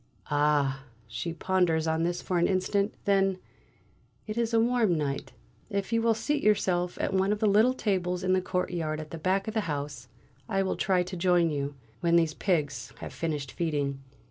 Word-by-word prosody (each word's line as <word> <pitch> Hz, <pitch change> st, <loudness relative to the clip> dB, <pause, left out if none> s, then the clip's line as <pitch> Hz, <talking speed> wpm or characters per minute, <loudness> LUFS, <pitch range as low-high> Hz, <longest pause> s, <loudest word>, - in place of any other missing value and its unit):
"Ah!" 145 Hz, -2 st, +2 dB, 0.2 s
she 145 Hz, +9 st, -4 dB
ponders 170 Hz, -2 st, +1 dB
on 160 Hz, 0 st, +1 dB
this 175 Hz, +1 st, -1 dB
for 180 Hz, -2 st, 0 dB
an 170 Hz, -, +3 dB
instant; 200 Hz, +2 st, 0 dB
then: 195 Hz, -2 st, +3 dB, 0.9 s
"It 215 Hz, -, -5 dB
is 235 Hz, -1 st, 0 dB
a 230 Hz, -, +4 dB
warm 225 Hz, -6 st, +2 dB
night; 140 Hz, -2 st, -3 dB, 0.4 s
if 200 Hz, +1 st, -2 dB
you 230 Hz, -, +3 dB
will 225 Hz, -1 st, +3 dB
seat 290 Hz, +7 st, -1 dB
yourself 180 Hz, -4 st, +2 dB
at -, -, -1 dB
one 190 Hz, +1 st, +2 dB
of 210 Hz, -, +1 dB
the 215 Hz, -, 0 dB
little 215 Hz, +5 st, +4 dB
tables 180 Hz, -5 st, -1 dB
in 185 Hz, 0 st, +2 dB
the 185 Hz, -, +3 dB
courtyard 175 Hz, -4 st, -2 dB
at 155 Hz, -1 st, -8 dB
the 165 Hz, -, -6 dB
back 190 Hz, +4 st, 0 dB
of 220 Hz, -, -3 dB
the 220 Hz, -, +1 dB
house, 140 Hz, -3 st, -4 dB, 0.4 s
I 195 Hz, -2 st, +1 dB
will 190 Hz, -, -1 dB
try 185 Hz, -3 st, +2 dB
to 185 Hz, +1 st, -7 dB
join 175 Hz, -2 st, +3 dB
you, 140 Hz, -1 st, -3 dB, 0.2 s
when 170 Hz, 0 st, +2 dB
these 165 Hz, -2 st, +3 dB
pigs 155 Hz, -6 st, -1 dB
have -, -, -8 dB
finished 150 Hz, -5 st, -3 dB
feeding." 145 Hz, -5 st, -2 dB
180 Hz, 195 wpm, -28 LUFS, 155-200 Hz, 0.9 s, a